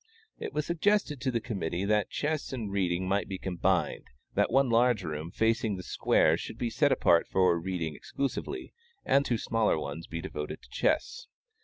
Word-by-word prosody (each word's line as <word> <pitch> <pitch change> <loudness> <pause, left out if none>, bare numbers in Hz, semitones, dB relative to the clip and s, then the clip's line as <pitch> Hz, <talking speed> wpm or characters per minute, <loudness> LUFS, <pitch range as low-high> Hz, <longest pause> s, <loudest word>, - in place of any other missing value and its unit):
It - - -4
was 150 0 -1
suggested 170 -4 +1
to 130 - 0
the 120 -2 0
committee 95 -5 -3
that 105 0 +2
chess 150 0 -2
and 115 -6 -4
reading 95 -2 0
might 100 +2 +1
be 95 - -4
combined; 90 -2 0 0.3
that - - +2
one 135 +2 +4
large 120 -2 +3
room 75 0 -4
facing 110 +1 +1
the 90 - -7
square - - +3
should - - -7
be 120 -1 -2
set - - +3
apart 85 - +4
for 90 -2 +3
reading 85 -3 -3
exclusively, 140 - -4 0.3
and 140 +1 +4
two 120 -4 0
smaller 115 -4 +1
ones 75 +2 -5
be 85 - -5
devoted 75 -2 -6
to - - -17
chess. 475 +1 0
105 Hz, 180 wpm, -29 LUFS, 90-130 Hz, 0.3 s, one